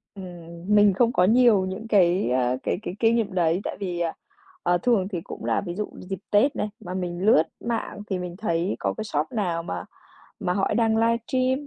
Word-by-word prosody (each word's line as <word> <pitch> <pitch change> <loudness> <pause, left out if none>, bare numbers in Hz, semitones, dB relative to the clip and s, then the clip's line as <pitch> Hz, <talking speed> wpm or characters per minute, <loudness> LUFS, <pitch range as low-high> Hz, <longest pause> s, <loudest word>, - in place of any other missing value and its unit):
Ừm, 195 - -8
ừm, 170 +2 -4
mình 205 -2 +6
không 235 +5 +2
có 180 - +3
nhiều 220 -2 +5
những 195 +4 -5
cái, 185 - +3
a, 125 0 +1
cái - - 0
cái 185 - -5
kinh 230 0 +4
nghiệm 215 -4 -1
đấy, 175 +1 +1
tại - - -4
vì, 180 -3 -3
ờ, 170 -1 0 0.5
ờ, 175 - +3
thường 200 -2 +2
thì 180 -5 -4
cũng - - -8
là - - +1
ví 175 -3 -5
dụ 210 +2 -2
như 185 - -13
dịp 195 -2 -4
Tết 245 +8 +4
này 210 - -2
mà 180 -4 -7
mình 175 -2 -3
lướt 185 -7 +6 0.2
mạng 230 -3 -3
thì 190 - -1
mình 180 -1 -5
thấy 175 -3 -1
có - - -1
cái 220 - -3
shop 155 -7 -2
nào 175 -7 -1
mà - - -5 0.6
mà 180 -3 0
họ 195 +2 0
đang 225 -1 +2
livestream 255 +4 +1
195 Hz, 225 wpm, -25 LUFS, 175-220 Hz, 0.6 s, mình